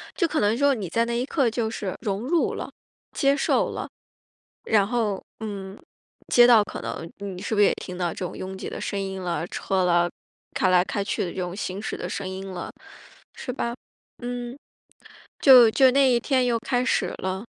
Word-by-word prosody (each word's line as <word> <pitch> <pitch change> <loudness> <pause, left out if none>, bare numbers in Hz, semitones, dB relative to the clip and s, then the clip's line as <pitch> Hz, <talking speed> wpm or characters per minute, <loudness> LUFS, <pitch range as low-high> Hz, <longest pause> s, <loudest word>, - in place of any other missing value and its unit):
就 345 - +2
可 315 - -1
能 210 +2 +2
说 285 +1 +4
你 210 -7 -4
在 230 +7 +1
那 235 0 -2
一 250 - -1
刻 275 -3 +1
就 230 0 -1
是 205 -4 -4
融 200 -1 -2
入 320 +8 +1
了， - - -5 0.4
接 275 -1 +2
受 - - +1
了， - - -5 0.8
然 205 -3 +3
后， 220 -5 -1 0.2
嗯， 200 -3 -6 0.5
街 240 0 +8
道 235 -3 +7
可 205 - -7
能， 165 - -5
你 195 -3 -6
是 220 - -2
不 205 - +2
是 - - +7
也 - - +3
听 180 - -8
到 175 -1 -1
这 - - -10
种 - - -8
拥 190 +1 -6
挤 - - -6
的 - - -6
声 200 - -3
音 190 -1 -4
了， 175 -2 -2
车 190 0 -1
了， 175 0 +3 0.4
开 185 - +2
来 180 -1 +4
开 200 +1 -2
去 200 - -2
的 175 - -4
这 - - -9
种 180 0 -4
行 190 -1 -4
驶 - - -4
的 - - -5
声 195 -2 -4
音 190 +1 -6
了， 180 - -6 0.6
是 - - -6
吧？ 235 -2 -3 0.5
嗯， 245 0 -5 0.8
就 255 -4 +9
就 260 +3 +5
那 275 +1 +4
一 240 -1 +3
天 260 -1 +1
又 240 -1 +2
开 245 +1 0
始 - - 0
了。 190 +2 -3
210 Hz, 225 characters per minute, -25 LUFS, 190-245 Hz, 0.8 s, 就